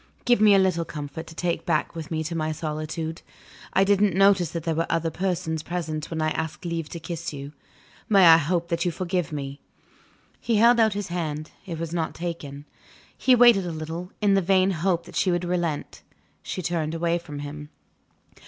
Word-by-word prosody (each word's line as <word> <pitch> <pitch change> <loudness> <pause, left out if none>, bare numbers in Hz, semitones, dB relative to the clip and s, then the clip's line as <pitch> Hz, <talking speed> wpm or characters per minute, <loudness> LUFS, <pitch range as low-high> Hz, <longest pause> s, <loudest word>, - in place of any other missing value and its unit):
Give 240 -3 +4
me 210 -2 +7
a - - +6
little 185 -3 +2
comfort 150 +1 -7
to 160 - -11
take 170 0 -1
back 155 -3 0
with 160 -2 -7
me 160 -1 -2
to 165 +2 -4
my 155 -1 -1
solitude. 155 +1 -4 0.5
I 190 - +4
didn't 200 -2 +3
notice 195 -3 +4
that 165 0 -5
there 165 - 0
were 165 +1 -1
other 165 -1 0
persons 170 -3 -2
present 160 -2 -4
when 160 -1 -2
I 155 - +1
asked 160 +1 -4
leave 165 -2 -3
to 170 - -6
kiss 165 0 -5
you. 140 +1 -8 0.6
May 195 -4 +6
I 165 -1 +9
hope 170 +2 -1
that 170 0 0
you 180 - +1
forgive 180 -1 -2
me?" 140 -1 -5 0.8
He 230 - 0
held 235 +3 +5
out 220 -2 +4
his 205 -2 -4
hand; 155 -3 -4 0.2
it 170 -3 -4
was 165 0 -5
not 165 -2 -2
taken. 150 -5 -6 0.5
He 255 - +4
waited 235 -6 +6
a - - -3
little, 165 +3 -6
in 205 -1 +4
the 195 - +4
vain 190 +1 +3
hope 170 0 0
that - - -12
she 190 - +2
would 175 0 0
relent: 175 -4 -2 0.4
she 185 - -5
turned 165 -2 -1
away 170 +1 0
from 150 -4 -9
him. 145 +1 -7
170 Hz, 200 wpm, -25 LUFS, 155-185 Hz, 0.8 s, I